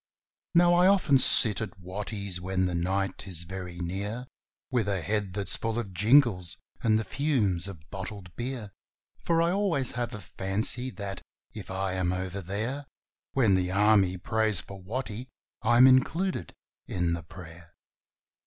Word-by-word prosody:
Now, 175 Hz, 0 st, +6 dB
I 175 Hz, +1 st, +5 dB
often 180 Hz, -9 st, +4 dB
sit 110 Hz, -4 st, +6 dB
at 100 Hz, -3 st, -6 dB
Watty's 100 Hz, 0 st, -5 dB
when 95 Hz, 0 st, 0 dB
the 90 Hz, -, -1 dB
night 95 Hz, +3 st, -2 dB
is 85 Hz, -3 st, 0 dB
very 90 Hz, 0 st, -7 dB
near, 100 Hz, +7 st, -4 dB, 0.5 s
With 120 Hz, -5 st, 0 dB
a 100 Hz, -1 st, 0 dB
head 105 Hz, -3 st, -1 dB
that's 100 Hz, -1 st, -1 dB
full 115 Hz, 0 st, -3 dB
of 105 Hz, -5 st, -4 dB
jingles 105 Hz, -, +3 dB, 0.2 s
and 110 Hz, -1 st, +3 dB
the 110 Hz, -, -1 dB
fumes 105 Hz, -, 0 dB
of 85 Hz, -6 st, -10 dB
bottled 95 Hz, -2 st, -7 dB
beer, 120 Hz, -4 st, -5 dB, 0.5 s
For 165 Hz, -1 st, +1 dB
I 170 Hz, -, +1 dB
always 180 Hz, -10 st, 0 dB
have 120 Hz, -2 st, -3 dB
a -, -, -7 dB
fancy 105 Hz, +8 st, -1 dB
that, 100 Hz, -5 st, -6 dB, 0.3 s
if -, -, -8 dB
I 95 Hz, 0 st, -2 dB
am 90 Hz, -1 st, 0 dB
over 95 Hz, +1 st, -3 dB
there 115 Hz, +10 st, -3 dB, 0.5 s
When 115 Hz, -7 st, +3 dB
the 90 Hz, -1 st, +1 dB
Army 100 Hz, -1 st, +3 dB
prays 110 Hz, +1 st, 0 dB
for 100 Hz, -1 st, -9 dB
Watty, 115 Hz, +4 st, -5 dB, 0.3 s
I'm 120 Hz, +2 st, +6 dB
included 130 Hz, -, +2 dB, 0.4 s
in 90 Hz, -2 st, -1 dB
the 85 Hz, -, -3 dB
prayer. 85 Hz, 0 st, -12 dB
100 Hz, 155 wpm, -28 LUFS, 95-120 Hz, 0.5 s, Now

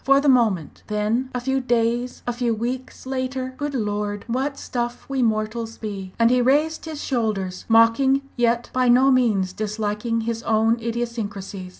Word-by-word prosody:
For 275 Hz, 0 st, +5 dB
the 285 Hz, -, 0 dB
moment! 220 Hz, -, +2 dB
then 215 Hz, +5 st, 0 dB
a 250 Hz, -, -2 dB
few 265 Hz, +2 st, 0 dB
days, 240 Hz, 0 st, 0 dB
a 245 Hz, -, -1 dB
few 235 Hz, -1 st, 0 dB
weeks 245 Hz, +5 st, -5 dB
later 260 Hz, 0 st, -3 dB
Good 290 Hz, +1 st, -3 dB
Lord! 205 Hz, -2 st, -2 dB
what 265 Hz, +4 st, -1 dB
stuff 240 Hz, -1 st, -4 dB
we 270 Hz, -1 st, -1 dB
mortals 225 Hz, 0 st, -1 dB
be!" 195 Hz, -4 st, -6 dB
And 230 Hz, 0 st, +4 dB
he 250 Hz, 0 st, +4 dB
raised 300 Hz, +6 st, +2 dB
his 310 Hz, -2 st, -6 dB
shoulders, 210 Hz, -7 st, -2 dB
mocking, 230 Hz, +5 st, +4 dB
yet 240 Hz, -1 st, +1 dB
by 255 Hz, -1 st, +2 dB
no 260 Hz, +3 st, +6 dB
means 210 Hz, -8 st, +2 dB
disliking 215 Hz, +2 st, -2 dB
his 230 Hz, 0 st, -3 dB
own 225 Hz, +1 st, +2 dB
idiosyncrasies. 220 Hz, -5 st, -4 dB
235 Hz, 165 wpm, -23 LUFS, 215-255 Hz, -, no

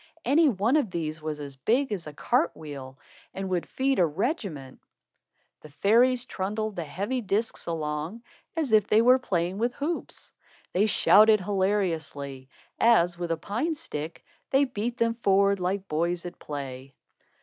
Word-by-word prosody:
Any 300 Hz, +4 st, +5 dB
one 230 Hz, +5 st, +2 dB
of 280 Hz, -9 st, 0 dB
these 160 Hz, -3 st, -4 dB
was 155 Hz, -1 st, -4 dB
as 140 Hz, -2 st, -7 dB
big 235 Hz, -, +1 dB
as 185 Hz, -6 st, -3 dB
a 150 Hz, -, -8 dB
cart 250 Hz, -, 0 dB
wheel, 135 Hz, -4 st, -8 dB, 0.4 s
and 195 Hz, 0 st, -4 dB
would 175 Hz, -2 st, -1 dB
feed 270 Hz, +1 st, 0 dB
a 175 Hz, -, +6 dB
regiment. 165 Hz, -, -3 dB, 0.8 s
The 155 Hz, -, -12 dB
fairies 240 Hz, -, +3 dB
trundled 215 Hz, +1 st, -3 dB
the 170 Hz, -, -4 dB
heavy 200 Hz, -, -3 dB
discs 215 Hz, +2 st, -2 dB
along, 160 Hz, +6 st, -3 dB, 0.3 s
as 305 Hz, -7 st, -1 dB
if 215 Hz, -2 st, +4 dB
they 220 Hz, +2 st, +4 dB
were 255 Hz, +2 st, +6 dB
playing 180 Hz, -4 st, -1 dB
with 240 Hz, +2 st, 0 dB
hoops. 325 Hz, +4 st, -4 dB, 0.4 s
They 200 Hz, +4 st, +3 dB
shouted 215 Hz, 0 st, +6 dB
hilariously, 170 Hz, -9 st, -2 dB, 0.3 s
as, 175 Hz, -7 st, +4 dB
with 175 Hz, -1 st, -3 dB
a 165 Hz, -, 0 dB
pine 240 Hz, -, -2 dB
stick, 155 Hz, -, -6 dB, 0.2 s
they 270 Hz, +1 st, +4 dB
beat 240 Hz, -1 st, -3 dB
them 230 Hz, 0 st, +2 dB
forward 200 Hz, -3 st, +2 dB
like 190 Hz, +2 st, -2 dB
boys 170 Hz, +2 st, -1 dB
at 175 Hz, -, -8 dB
play. 135 Hz, -2 st, -7 dB
195 Hz, 160 wpm, -27 LUFS, 160-235 Hz, 0.8 s, a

